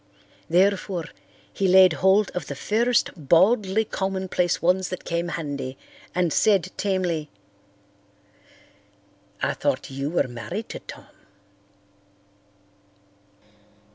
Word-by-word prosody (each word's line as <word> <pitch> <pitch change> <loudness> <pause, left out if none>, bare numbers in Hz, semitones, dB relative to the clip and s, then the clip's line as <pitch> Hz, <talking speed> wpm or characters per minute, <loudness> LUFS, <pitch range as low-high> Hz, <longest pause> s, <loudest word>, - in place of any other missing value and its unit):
Therefore 185 0 +1 0.5
he 195 - 0
laid 185 -1 +7
hold 190 +5 +3
of 180 -5 -5
the 140 - -5
first 230 - +1
baldly 190 - +3
commonplace 190 -3 -1
ones 180 +2 +1
that 185 - -6
came 170 0 -2
handy 140 -6 -5 0.4
and 175 -3 +1
said 190 -4 +2
tamely, 180 -6 -1 2.1
"I - - +1
thought - - -2
you 135 +2 -3
were 170 -5 +1
married 115 -3 -6
to - - -6
Tom." - - -11
180 Hz, 100 wpm, -24 LUFS, 160-195 Hz, 2.1 s, laid